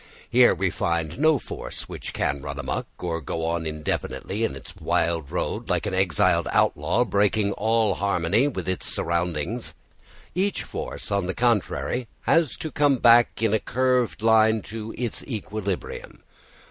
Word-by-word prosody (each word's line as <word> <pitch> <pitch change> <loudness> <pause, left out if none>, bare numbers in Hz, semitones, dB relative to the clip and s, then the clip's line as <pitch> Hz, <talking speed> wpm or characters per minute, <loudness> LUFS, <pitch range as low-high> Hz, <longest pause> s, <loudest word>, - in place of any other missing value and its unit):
Here - - +6
we - - 0
find 85 - -1
no 155 0 +5
force - - -6
which - - -6
can 70 +1 -1
run 70 0 -6
amok, 70 - -3
or 85 -2 -3
go 80 +2 -3
on 85 -1 -1
indefinitely 80 +6 -3
in 115 - -1
its 70 - -11
wild 85 -3 0
road, - - -3
like - - +1
an 100 - -2
exiled 95 -5 +2
outlaw, 85 +12 +2
breaking 105 -1 +2
all 110 -1 +2
harmony 100 +6 +1
with 95 - -4
its 95 0 -2
surroundings; 85 +6 -2 0.6
each 195 +2 0
force, - - -6
on 100 -3 +1
the 95 - -2
contrary, 120 +1 0
has 165 -4 +2
to 155 - -5
come 145 -2 +3
back 120 -1 +5
in 110 -2 +2
a 110 - +3
curved 125 -2 0
line 110 -1 +4
to 110 0 -6
its 120 -2 -3
equilibrium. 105 -5 -5
105 Hz, 155 wpm, -25 LUFS, 85-115 Hz, 0.6 s, Here